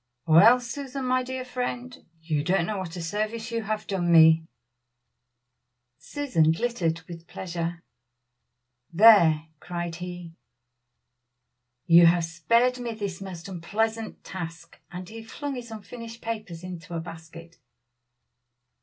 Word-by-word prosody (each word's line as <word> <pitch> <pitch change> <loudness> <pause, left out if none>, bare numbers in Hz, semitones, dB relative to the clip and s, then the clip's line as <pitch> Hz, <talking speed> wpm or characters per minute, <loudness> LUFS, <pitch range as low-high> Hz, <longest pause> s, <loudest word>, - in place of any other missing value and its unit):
"Well! 200 +10 +7
Susan, 265 +2 -5
my 255 0 +2
dear 255 0 -5
friend, 250 0 -4 0.3
you 155 -3 -1
don't 180 +1 +1
know 210 0 -3
what 180 -2 -6
a 175 - -5
service 215 +6 -3
you 230 0 -1
have 215 0 -3
done 175 -3 -1
me!" 160 0 +6 1.5
Susan 165 - +1
glittered 170 -4 -1
with 170 -1 -10
pleasure. 170 -2 -5 1.1
"There!" 170 -5 +6
cried 175 0 -5
he, 175 -1 -7 1.5
"you 170 0 +8
have 170 0 +3
spared 230 +10 +1
me 240 -2 -4
this 200 -4 -5
most 185 -3 -8
unpleasant 220 +5 -3
task," 165 -3 -8
and 180 0 -7
he 225 +1 -9
flung 280 +6 -6
his 245 -2 -7
unfinished 230 +1 -9
papers 215 -8 -6
into 180 -1 -7
a - - -1
basket. 165 0 -11
185 Hz, 125 wpm, -26 LUFS, 165-230 Hz, 1.5 s, you